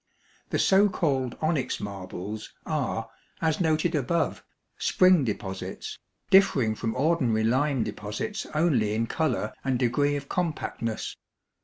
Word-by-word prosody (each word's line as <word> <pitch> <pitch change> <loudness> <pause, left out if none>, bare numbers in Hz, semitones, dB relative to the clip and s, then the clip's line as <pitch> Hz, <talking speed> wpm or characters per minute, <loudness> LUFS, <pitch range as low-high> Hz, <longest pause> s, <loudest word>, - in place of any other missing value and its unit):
The - - 0
so 200 +2 +5
called 135 -9 0
onyx 155 -4 0
marbles 100 +1 -6
are, - - -1 0.3
as 160 +1 +1
noted 160 +1 +2
above, 160 +3 0 0.4
spring 185 -4 +5
deposits, 95 -4 -5 0.3
differing 150 - +5
from 110 +1 -3
ordinary 130 -6 +2
lime 130 +2 +2
deposits 105 - -4
only 125 -10 +2
in 115 +1 +1
color 160 +6 -1
and 135 -2 +1
degree 140 +4 +2
of 140 -1 -5
compactness. 150 -10 -2
135 Hz, 120 wpm, -27 LUFS, 110-160 Hz, 0.4 s, so